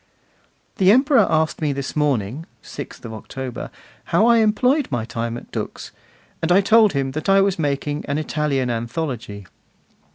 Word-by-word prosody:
The 190 0 +5
Emperor 270 +5 +4
asked 160 0 0
me 150 -2 0
this 140 -1 -5
morning, 145 -1 -1 0.2
6th - - -9
October, 120 +3 -7 0.4
how 215 - +3
I 235 0 +5
employed 250 +7 +2
my 120 -4 -1
time 115 0 -4
at - - -12
Dux, - - -6 0.5
and 165 - 0
I 185 - +6
told 215 +1 +4
him 135 -1 -1
that 155 +6 -4
I 195 0 +6
was 195 -2 +1
making 145 0 -2
an 140 - -1
Italian 150 -5 -1
anthology. 115 - -4
150 Hz, 155 wpm, -21 LUFS, 125-195 Hz, 0.5 s, I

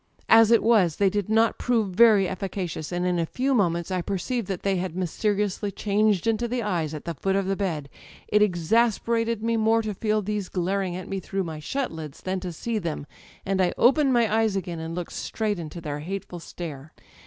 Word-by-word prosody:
As 225 -1 +7
it 230 -1 +5
was, 205 -9 +4
they 195 -2 +2
did 205 0 -2
not 225 +1 +3
prove 230 -5 +1
very 205 0 +5
efficacious, 185 -4 -4
and 175 0 -1
in 180 -1 +1
a 165 - +1
few 265 +8 0
moments 170 -5 +1
I 185 -1 0
perceived 200 +5 -2
that 190 -3 -4
they 195 -1 +1
had 180 -2 -3
mysteriously 205 +3 -1
changed 205 -1 +1
into 225 +1 +1
the 240 0 -2
eyes 165 -7 -1
at 150 - -8
the 170 - -3
foot 190 +6 -1
of 195 -1 +1
the 195 +1 0
bed. 165 -8 -2 0.4
It 210 - +3
exasperated 225 +4 +1
me 230 0 +1
more 225 +1 +3
to 215 -1 -3
feel 215 +1 0
these 205 -1 -3
glaring 185 0 -1
at 185 - -6
me 195 - -3
through 195 +1 -3
my 160 -3 -6
shut 265 - -2
lids 155 -3 -8
than 185 0 -2
to 180 -1 -5
see 220 +7 -3
them, 165 -5 -4 0.4
and 190 0 +1
I 180 - +2
opened 275 +2 +4
my 230 -3 +3
eyes 220 -3 +2
again 175 -3 -3
and 160 +1 -5
looked 175 -1 -5
straight 210 -4 -2
into 165 +1 -7
their 150 -3 -4
hateful 180 +2 -6
stare 155 -4 -8
195 Hz, 210 wpm, -25 LUFS, 175-220 Hz, 0.4 s, As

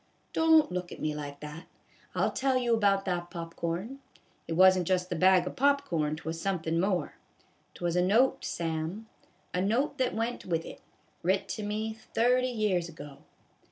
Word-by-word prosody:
Don't 320 - +5
look 180 -1 -4
at - - -8
me 155 - -1
like 145 -1 -7
that. 150 +2 -8 0.5
I - - 0
'11 - - +1
tell 265 -1 +2
you 240 -2 +1
about 200 -3 +2
that 175 -2 -2
pop 165 -2 -7
corn. 185 +11 -3 0.5
It - - -2
wasn't 185 0 +5
just 180 0 0
the - - 0
bag 185 +1 +5
of 180 - -5
pop 280 +1 +3
corn, 155 -3 0
'twas 160 +1 -5
somethin' 165 -4 -1
more. 185 0 0 0.6
'T - - -10
was 170 -1 0
a 180 - +3
note, 220 +9 +3
Sam, 165 +5 -3 0.5
a 180 - 0
note 255 +8 0
that 255 -3 +1
went 230 +2 -2
with 165 -2 -2
it, - - -10 0.4
writ 190 +3 +1
to 215 - -4
me 215 +1 -2
thirty 245 +3 +1
years 205 -7 0
ago." 145 -3 -11
185 Hz, 185 wpm, -29 LUFS, 165-225 Hz, 0.6 s, Don't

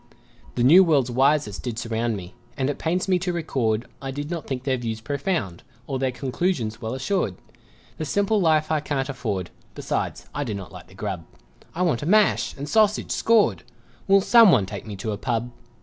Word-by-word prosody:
The 120 - +1
new 170 +9 +8
world's 140 -8 +2
wisest 135 -4 +2
did 120 -3 -4
surround 115 -1 -1
Me; 90 0 -9 0.2
and 135 +1 0
it - - -8
pains 180 +4 -1
me 185 -1 +2
to 180 0 -2
record 125 -10 -1
I 135 - -5
did 145 +4 -5
not 170 -2 -4
think 130 -2 -4
their 130 -1 +1
views 115 -2 -4
profound, 140 - -2 0.2
Or 135 -2 -3
their 130 -1 0
conclusions 130 -3 -2
well 115 +2 -3
assured; 135 - -1 0.6
The 155 - -2
simple 200 +6 +1
life 155 -2 +2
I 155 - +2
can't 145 -2 -2
afford, 105 -10 -3 0.2
Besides, - - -3
I 145 - -2
do 110 -7 -4
not 95 -3 -8
like - - -11
the - - -17
grub - - -4 0.5
I 180 - 0
wait 155 -10 +1
a 150 - -4
mash 210 +2 +3
and 140 +1 -5
sausage, 215 0 +2
"scored" 225 -2 +3 0.5
Will 195 0 +6
someone 195 - +6
take 100 +2 -8
me 105 - -6
to 105 +3 -4
a 105 - -3
pub? 120 0 -2
135 Hz, 195 wpm, -24 LUFS, 115-170 Hz, 0.6 s, new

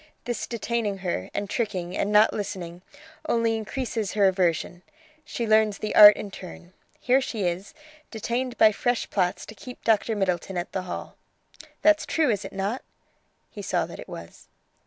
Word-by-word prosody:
This 240 -1 -3
detaining 230 -3 -2
her, 95 - -2
and 205 - -3
tricking, 190 -6 -3
and 205 - -1
not 210 +1 +5
listening, 180 -4 -5 0.5
only 230 -1 +2
increases 225 -1 -3
her 205 -2 +4
aversion; 180 -2 0 0.4
she 240 -5 -4
learns 215 -2 +3
the 215 - -4
art 210 -1 +10
in 205 - -6
turn. 180 -1 -11 0.3
Here 255 +2 +3
she 225 -5 -3
is, 180 - -3 0.3
detained 240 +2 -3
by 220 - +7
fresh 245 +3 -1
plots 180 -3 0
to - - -10
keep 250 +4 -11
Dr. 225 0 +2
Middleton 185 -2 -1
at 175 +3 -4
the 190 - -2
Hall. - - -6 0.7
That's 315 0 +4
true, 310 -6 +2
is 205 -1 -2
it 195 - -7
not?" 200 +6 -2 0.7
He - - -8
saw - - 0
that - - -10
it - - -10
was. - - -10
210 Hz, 170 wpm, -25 LUFS, 190-235 Hz, 0.7 s, art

